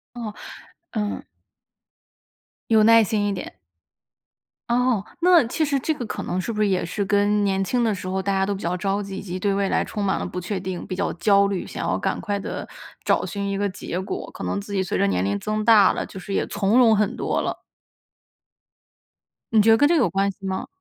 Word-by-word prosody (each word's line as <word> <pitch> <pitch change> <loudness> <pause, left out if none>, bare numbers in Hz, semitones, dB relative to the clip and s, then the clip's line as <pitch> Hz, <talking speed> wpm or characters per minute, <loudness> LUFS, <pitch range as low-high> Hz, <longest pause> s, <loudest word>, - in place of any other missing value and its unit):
哦， 220 -3 -5 0.6
嗯。 210 -2 -3 1.5
有 220 -1 +6
耐 230 0 +7
心 205 0 0
一 205 - 0
点。 185 - -6 1.2
哦， 240 -3 +1 0.2
那 345 -3 +6
其 310 +6 0
实 280 -1 0
这 315 +4 0
个 245 - -5
可 - - -5
能 180 - -2
是 230 +5 -3
不 210 - -2
是 210 - +3
也 185 -3 0
是 200 +4 -2
跟 205 +1 +2
年 195 -1 +1
轻 240 +5 0
的 220 -2 +2
时 185 -1 -6
候 190 +1 -1
大 200 +1 -1
家 190 0 +1
都 200 - -1
比 195 - -8
较 175 +1 -1
着 200 +1 -1
急， 195 -1 -7
以 - - -5
及 185 -2 -5
对 200 +1 +1
未 195 0 0
来 - - +1
充 210 - -5
满 190 - +1
了 - - -3
不 180 - -5
确 185 +3 -3
定， 185 -1 -5
比 185 - -4
较 200 - -1
焦 200 +3 +3
虑， 195 -2 -3
想 - - -5
要 - - +1
赶 - - -2
快 205 -2 -2
地 - - -5 0.4
找 - - +2
寻 200 -1 -3
一 195 - -2
个 205 0 0
结 185 -1 -5
果？ 190 - -5
可 - - -8
能 200 - -2
自 205 - -10
己 190 - +1
随 - - -2
着 100 - +2
年 90 -1 0
龄 100 +1 0
增 215 0 -2
大 215 -4 +7
了， - - -3
就 190 - -10
是 195 +2 -6
也 - - +1
从 205 +3 +1
容 225 -3 +6
很 210 +3 0
多 - - -1
了。 - - -4 1.9
你 220 - +5
觉 225 +2 +5
得 225 - +6
跟 290 +2 +4
这 340 - +4
个 280 - +4
有 190 - +2
关 195 +2 +1
系 195 0 -13
吗？ 190 0 -3
200 Hz, 255 characters per minute, -23 LUFS, 190-220 Hz, 1.9 s, 耐